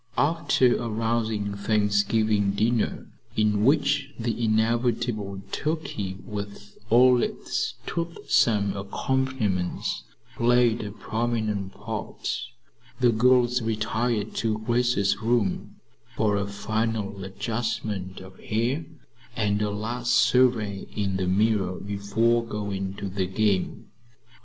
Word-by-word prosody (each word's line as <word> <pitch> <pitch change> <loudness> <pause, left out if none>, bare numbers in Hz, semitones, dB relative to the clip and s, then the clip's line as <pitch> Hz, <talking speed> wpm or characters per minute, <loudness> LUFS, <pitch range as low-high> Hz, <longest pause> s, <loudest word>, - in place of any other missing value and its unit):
After 145 -5 +3
a 120 - -3
rousing 110 -2 -1
Thanksgiving 105 0 +2
dinner, 110 +2 0 0.3
in 105 -1 +2
which 140 +1 +3
the 115 0 -2
inevitable 110 -2 0
turkey, 125 - -3
with 105 0 -7
all 125 +1 +6
its - - -2
toothsome 115 - +1
accompaniments, 105 -2 -1 0.4
played 120 -1 +3
a 105 - -5
prominent 110 -3 -2
part, 110 0 -4 0.6
the 125 -1 +5
girls 125 +1 +4
retired 110 0 -1
to 110 -2 0
Grace's 115 -3 +1
room 115 -4 0 0.4
for 105 -2 +2
a 100 0 -1
final 105 -1 -2
adjustment 105 -2 -3
of 95 0 -13
hair 120 +8 -1 0.5
and 105 -3 +1
a 105 - +1
last 120 +4 -1
survey 120 -5 +3
in 100 -3 -1
the 95 -1 -1
mirror 100 -1 +2
before 100 +4 +1
going 100 -3 -4
to 100 - -5
the 95 -1 -2
game. 100 0 0
110 Hz, 105 wpm, -26 LUFS, 100-120 Hz, 0.6 s, all